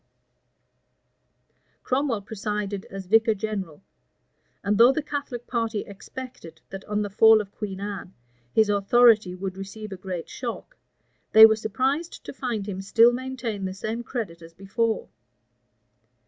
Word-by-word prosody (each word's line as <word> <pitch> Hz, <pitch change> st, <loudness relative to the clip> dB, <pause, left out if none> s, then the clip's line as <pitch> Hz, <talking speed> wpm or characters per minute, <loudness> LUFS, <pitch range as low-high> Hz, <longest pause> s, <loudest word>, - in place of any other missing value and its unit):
Cromwell 255 Hz, -5 st, 0 dB
presided 210 Hz, -1 st, -4 dB
as 195 Hz, -1 st, -8 dB
vicar 225 Hz, +3 st, +4 dB
general; 195 Hz, -7 st, -5 dB, 0.8 s
and 205 Hz, 0 st, +1 dB
though 240 Hz, +3 st, +8 dB
the 305 Hz, +2 st, -2 dB
Catholic 285 Hz, -5 st, -5 dB
party 230 Hz, -3 st, -2 dB
expected, 200 Hz, -5 st, -10 dB
that 195 Hz, 0 st, -7 dB
on 210 Hz, 0 st, -1 dB
the 205 Hz, -, -4 dB
fall 220 Hz, +2 st, +6 dB
of 200 Hz, -2 st, -6 dB
Queen 195 Hz, -3 st, -6 dB
Anne, 200 Hz, -2 st, -6 dB, 0.4 s
his 220 Hz, -, +4 dB
authority 205 Hz, -1 st, +4 dB
would 190 Hz, 0 st, -5 dB
receive 200 Hz, +2 st, -8 dB
a 190 Hz, -, -6 dB
great 180 Hz, -2 st, -6 dB
shock, 250 Hz, -, -6 dB, 0.6 s
they 220 Hz, 0 st, +11 dB
were 220 Hz, 0 st, +5 dB
surprised 265 Hz, -, -2 dB
to -, -, -7 dB
find 235 Hz, -7 st, -3 dB
him 190 Hz, -2 st, -4 dB
still 230 Hz, +5 st, +5 dB
maintain 245 Hz, -5 st, -4 dB
the 185 Hz, 0 st, -4 dB
same 220 Hz, +4 st, -4 dB
credit 220 Hz, -9 st, -5 dB
as 165 Hz, 0 st, -14 dB
before. 220 Hz, +4 st, -1 dB
215 Hz, 140 wpm, -25 LUFS, 195-235 Hz, 0.8 s, they